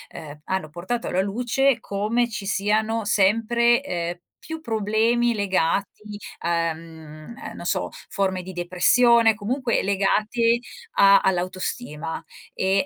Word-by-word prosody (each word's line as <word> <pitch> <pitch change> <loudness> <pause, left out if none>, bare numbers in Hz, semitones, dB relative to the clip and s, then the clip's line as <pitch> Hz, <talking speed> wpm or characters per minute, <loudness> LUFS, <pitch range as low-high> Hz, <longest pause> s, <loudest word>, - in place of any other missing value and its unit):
uhm, 150 -2 -9
hanno 190 -5 -2
portato 185 +9 -4
alla 185 - +1
luce 245 +5 +1
come 220 +4 -1
ci 205 -3 -6
siano 215 +2 0
sempre, 230 +5 +3
ehm, 175 -8 -3 0.2
più 320 0 -7
problemi 225 0 +1
legati, 200 +1 -1 0.3
uhm, 160 0 -4
uhm, 295 - -8
non - - -9
so - - -1 0.2
forme 190 -2 -1
di 185 +1 -8
depressione, 225 +7 +4
comunque 240 +4 -1
legati 215 +4 +1 0.4
a 200 0 +7
all'autostima 180 -3 -3 0.3
e 190 +7 +1
200 Hz, 115 wpm, -23 LUFS, 180-235 Hz, 0.4 s, a